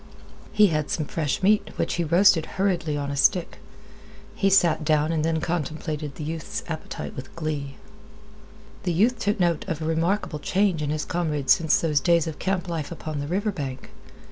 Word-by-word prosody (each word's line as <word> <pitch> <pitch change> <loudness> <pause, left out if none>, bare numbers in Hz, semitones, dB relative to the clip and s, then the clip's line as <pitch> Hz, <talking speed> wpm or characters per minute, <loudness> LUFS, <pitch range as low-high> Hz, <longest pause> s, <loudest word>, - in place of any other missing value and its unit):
He 210 -2 +5
had 155 -2 -1
some 155 - -1
fresh 155 +2 -2
meat, 210 +1 +3
which - - -1
he 175 - 0
roasted 170 0 +4
hurriedly 175 -6 0
on 140 -1 -3
a - - -3
stick. 175 +5 +2 0.7
He 195 - +1
sat 170 -5 +4
down 155 +1 +2
then - - 0
and 160 - -2
contemplated 155 -3 -3
the 155 - -6
youth's 165 +9 -4
appetite 160 -2 -6
with 130 -1 -9
glee. 150 -4 -4 1.1
The 180 -4 -1
youth 225 +8 +2
took 205 -1 0
note 170 -3 +1
of 160 - -2
a 160 - -4
remarkable 165 +1 0
change 190 0 +1
in 145 - -2
his 155 0 -2
comrade 150 -6 -1
since 160 -2 +4
those 155 -3 +2
days 170 +2 +3
of 160 -2 -6
camp 190 -1 -1
life 165 -3 -4
upon 155 -3 -5
the 145 - -4
river 200 +6 0
bank. 135 -7 -6
160 Hz, 185 wpm, -25 LUFS, 150-185 Hz, 1.1 s, He